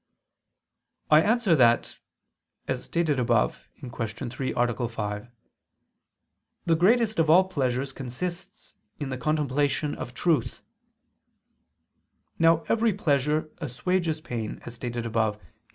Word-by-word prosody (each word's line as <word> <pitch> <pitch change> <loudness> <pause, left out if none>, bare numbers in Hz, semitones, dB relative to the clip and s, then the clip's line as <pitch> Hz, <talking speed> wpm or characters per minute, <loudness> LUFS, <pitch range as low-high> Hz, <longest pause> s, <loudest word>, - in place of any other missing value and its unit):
I 155 +1 +8
answer 215 -2 +3
that, 120 -4 +3 0.7
As 130 -1 -3
stated 160 -5 0
above 120 -2 +1
(Q. 130 -4 -8 0.4
3, 130 +2 -3
A. 120 0 +1
5), 105 -1 -4 1.4
the 165 - +3
greatest 220 +4 +3
of 160 -1 +3
all 180 +4 +7
pleasures 135 -5 -1
consists 170 +9 -6 0.3
in 145 -3 -4
the 130 - -3
contemplation 145 +1 0
of 120 - -7
truth. 165 -4 0 1.8
Now 165 0 +4
every 230 -1 +2
pleasure 150 -3 0
assuages 160 +3 -1
pain 115 -7 -5
as 120 - -7
stated 120 0 -4
above 110 -2 0
(A. - - -25
145 Hz, 115 wpm, -26 LUFS, 120-165 Hz, 1.8 s, I